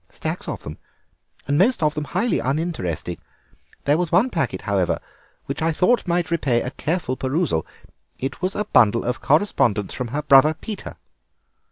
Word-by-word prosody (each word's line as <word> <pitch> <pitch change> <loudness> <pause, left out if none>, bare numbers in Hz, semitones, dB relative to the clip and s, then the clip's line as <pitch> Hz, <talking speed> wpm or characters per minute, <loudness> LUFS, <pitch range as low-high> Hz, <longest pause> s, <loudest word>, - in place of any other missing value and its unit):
"Stacks - - -4
of - - -5
them, 75 - -8 0.7
and 145 +2 +2
most 215 -1 +3
of 150 -1 +2
them 150 -1 -3
highly 235 +10 0
uninteresting. 125 - -2 0.7
There 145 +3 +3
was 175 -3 -1
one 215 +9 +3
packet, 130 - -2
however, 95 -3 0 0.5
which - - -4
I 165 +1 +2
thought 190 +8 +2
might 170 -1 0
repay 135 -8 +1
a 125 - -4
careful 155 -2 -2
perusal. 130 - -1 0.5
It 135 - -5
was 185 +1 -1
a 210 - -1
bundle 115 - +4
of 125 +1 -2
correspondence 135 - +2
from 125 - -3
her 145 +6 -3
brother 150 +2 +6
Peter." 210 +5 -7
150 Hz, 165 wpm, -22 LUFS, 125-175 Hz, 0.7 s, brother